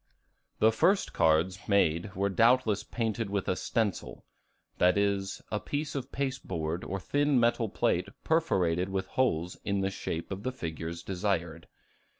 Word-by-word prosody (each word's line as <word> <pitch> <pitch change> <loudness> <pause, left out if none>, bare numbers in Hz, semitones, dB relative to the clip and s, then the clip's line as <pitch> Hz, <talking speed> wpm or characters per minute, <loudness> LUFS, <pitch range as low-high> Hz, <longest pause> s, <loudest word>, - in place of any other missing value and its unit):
The 110 - +5
first 190 - +2
cards 80 +4 +2
made 95 -1 +2
were 100 +2 +1
doubtless 115 +1 +3
painted 115 -2 -2
with 100 -1 -2
a 95 - +1
stencil; 110 +1 -2 0.5
that 90 +2 +4
is, 100 -1 0
a 105 - 0
piece 145 +4 -3
of 135 -1 -5
pasteboard 95 - -3
or 95 - -3
thin 145 +5 +2
metal 120 -1 +2
plate - - +1 0.2
perforated 95 - +1
with 95 0 -2
holes 90 -9 0
in 100 -1 0
the 95 0 0
shape 85 -3 -4
of 95 0 -4
the 130 - -2
figures 85 -6 -5
desired. 90 -4 -2
100 Hz, 150 wpm, -29 LUFS, 90-120 Hz, 0.5 s, The